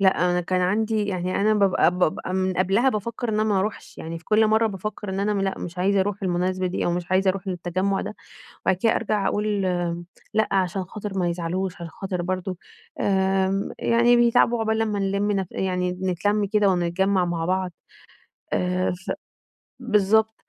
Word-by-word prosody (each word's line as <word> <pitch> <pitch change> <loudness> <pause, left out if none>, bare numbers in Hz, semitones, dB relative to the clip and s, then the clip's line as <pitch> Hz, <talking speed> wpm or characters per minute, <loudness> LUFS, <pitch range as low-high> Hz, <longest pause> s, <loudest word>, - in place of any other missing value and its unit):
لأ 190 -2 +3
أنا 180 0 +1
كان 180 +1 0
عندي 210 +3 +1
يعني 185 -2 -2
أنا 215 +1 +3
بابقى 195 -4 +4
بابقى 180 +1 0
من 190 0 +1
قبلها 195 +8 +3
بافكّر 230 +1 -3
إن 220 - 0
أنا 215 0 +2
ما 210 -3 +2
أروحش، 205 +2 -4
يعني 165 +1 -5
في 170 - -23
كل 215 0 +4
مرّة 220 +1 +3
بافكّر 210 0 -5
إن 190 - -2
أنا 205 -1 0
لأ 195 0 -1
مش 175 +1 -7
عايزة 195 +2 +2
أروح 205 +1 -2
المناسبة 185 0 0
دي 180 - -2
أو 175 - +1
مش 175 0 -4
عايزة 190 0 +4
أروح 195 +1 -6
للتجمع 185 +2 -1
ده، - - -5 0.5
وبعد 190 - +4
كده 220 +5 +2
أرجع 210 -3 0
أقول 210 +2 0 0.9
لأ 220 0 +2
علشان 190 0 +1
خاطر 200 +1 -6
ما 175 - +1
يزعلوش، 175 +2 -2
علشان 170 - -7
خاطر 190 -2 -2
برضو 185 +1 -3 0.4
آمم، 190 0 +1
يعني 235 +1 +4
بيتعبوا 240 0 +4
عقبال 220 0 0
لمّا 215 -2 0
نلم 200 +1 0
نف 195 -2 -1
يعني 180 -1 -1
نتلم 190 +3 0
كده 205 0 +2
ونتجمع 185 +1 +1
مع 170 -1 -2
بعض، 185 0 0 0.8
آآ 180 0 +1
ف - - -3 0.7
بالضبط، 220 -2 +2
195 Hz, 180 wpm, -24 LUFS, 180-210 Hz, 0.9 s, بابقى